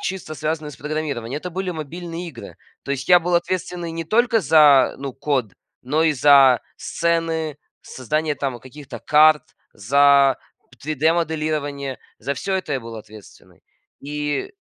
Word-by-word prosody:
чисто 185 -4 -5
связанный 155 +1 -3
с - - -13
программированием, 145 -5 -4
это 180 +4 -6
были 185 +1 -3
мобильные 170 +2 -6
игры. 125 -7 -11 0.3
То - - -8
есть 135 -1 -3
я 180 -1 +7
был 175 +1 -1
ответственный 175 -1 -3
не 165 - -4
только 230 +5 +2
за, 150 -5 +5
ну 135 -1 -5
код, 135 -6 -2 0.3
но 150 +5 0
и 160 -1 +3
за 135 -3 +5 0.2
сцены, 165 -2 -2 0.3
создание 150 +4 -2
там 135 -4 -4
каких-то 130 0 -11
карт, 155 +2 +4 0.3
за 140 +4 +4 0.4
3D-моделирование, 155 -2 -1 0.2
за 140 +5 -3
всё 190 +8 -3
это 185 -6 -3
я 135 - -1
был 115 0 -9
ответственный. 105 -1 -15 0.4
И 150 - -4
150 Hz, 145 wpm, -21 LUFS, 135-165 Hz, 0.4 s, я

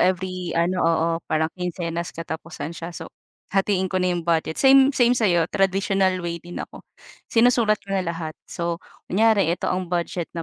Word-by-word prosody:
every 185 -1 0
ano 175 +2 +1
oo, 165 0 +2 0.2
parang 160 0 0
kinsenas-katapusan 165 -2 -5
siya 165 +1 -6
so, - - -7 0.5
hatiin 195 -1 +2
ko 185 - -2
na 185 - +2
'yong 175 -1 -3
budget. 160 -1 0
Same, 270 0 +6
same 245 -1 +5
sa'yo 180 -8 +3
traditional 195 -1 +1
way 170 0 -2
din 175 0 -8
ako, - - -9 0.5
sinusulat 230 -2 +4
ko 195 0 -5
na 190 - +1
lahat 165 -2 -4
so 170 0 -2 0.3
kunyari 215 -2 +3
ito 175 - -2
ang 185 0 -2
budget 175 -1 -2
na 165 - -2
180 Hz, 165 wpm, -23 LUFS, 170-195 Hz, 0.5 s, Same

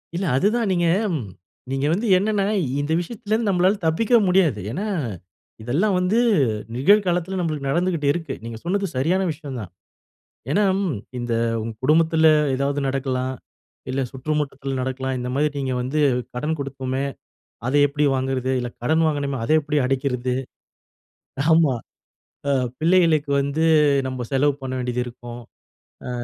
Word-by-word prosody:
இல்ல 190 +3 -1
அதுதா 210 - +2
நீங்க 175 -2 +1 0.3
ம் 130 -8 -3 0.5
நீங்க 135 +1 -1
வந்து 215 +6 -1
என்னன்னா 205 0 +1 0.4
இந்த 145 - -3
விஷயத்துலேருந்து 215 +3 -2
நம்மளால 185 +2 +3
தப்பிக்க 210 +9 0
முடியாது. 180 - +3
ஏன்னா 190 - -3 0.8
இதெல்லாம் 175 - +1
வந்து 185 +6 +2 0.6
நிகழ் 200 - +4
காலத்தில 180 +2 0
நம்மளுக்கு 155 -5 -2
நடந்துகிட்டு 170 -1 0
இருக்கு. 160 -5 -4
நீங்க 115 -1 -6
சொன்னது 195 +3 0
சரியான 170 +9 +1
விஷயம் 145 -4 -7
தான். 95 - -9 0.8
ஏன்னா 205 +8 +3 0.2
ம் 170 - -1 0.2
இந்த 120 -1 -3 0.5
குடும்பத்துல 160 +3 +4 0.3
ஏதாவது 140 +2 -1
நடக்கலாம், 130 -1 -2 0.6
இல்ல 135 +1 -1
சுற்றுவட்டத்தில 135 -1 -3
நடக்கலாம், 130 0 -2
இந்த 125 0 -3
மாதிரி 150 +2 +1
நீங்க 130 -2 -1
வந்து 135 +5 -1 0.4
கடன் 155 +4 -2
கொடுப்போமே 135 -1 -3 0.6
அதை 140 - +2
எப்படி 145 +1 -1
வாங்குறது 130 0 -1
இல்ல, 125 0 -3
கடன் 160 +5 +2
வாங்கணுமே 140 -3 -1
அதை 155 - +3
எப்படி 150 0 -1
அடைக்கிறது. 130 -1 -1 1.2
ஆமா. 160 -5 +4 0.7
ஆ - - +3 0.3
பிள்ளைகளுக்கு 160 -4 +3
வந்து 140 +3 -1 0.4
நம்ம 130 -2 -4
செலவு 140 +2 +3
பண்ண 130 -1 -4
வேண்டியது 125 0 -1
இருக்கும். 120 0 -9 0.7
ஆ - - -4
145 Hz, 135 wpm, -22 LUFS, 130-175 Hz, 1.2 s, நிகழ்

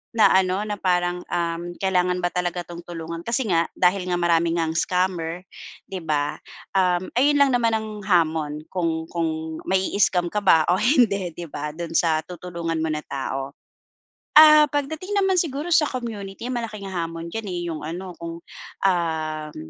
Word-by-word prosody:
Na 220 - +6
ano, 190 +1 +2
na 210 -1 -4
parang, 180 -1 0
uhm, 170 0 -3
kailangan 180 -1 0
ba 175 - +1
talaga 180 0 -2
'tong 170 0 -10
tulungan, 165 -1 -6
kasi 235 -1 0
nga 165 0 +3
dahil 180 +1 +2
nga 180 - 0
marami 170 -1 +2
ngang 165 -1 0
scammer, 180 -1 -1 0.5
'di 190 - -3
ba, 150 -3 -1 0.3
um, 185 -1 +1
ayun 290 +2 +4
lang 280 -1 +4
naman 235 -2 +2
ang 220 0 -3 0.2
hamon 160 -5 +1
kung 165 -3 -1
kung 160 -1 -3
mai-scam 185 -2 +1
ka 210 - 0
ba 175 -6 +5
o 180 - +3
hindi, 210 - +2
'di 170 -3 -7
ba? 150 +1 -5
Do'n 170 0 -5
sa 160 -2 +2
tutulungan 170 -2 -5
mo 160 - 0
na 150 -1 -2
tao. 135 0 -4 0.9
Ah, 305 -1 +9
pagdating 315 +8 -3
naman 385 -2 +3
siguro 305 +1 -3
sa 305 -2 +4
community, 230 -2 -5
malaking 215 -5 -5
hamon 165 -1 -4
diyan, 225 -2 -4
eh, 175 -1 -3
yung 155 - -5
ano, 175 +4 -6
kung, 170 0 -7 0.4
um 160 -4 -1
180 Hz, 165 wpm, -23 LUFS, 165-210 Hz, 0.9 s, Ah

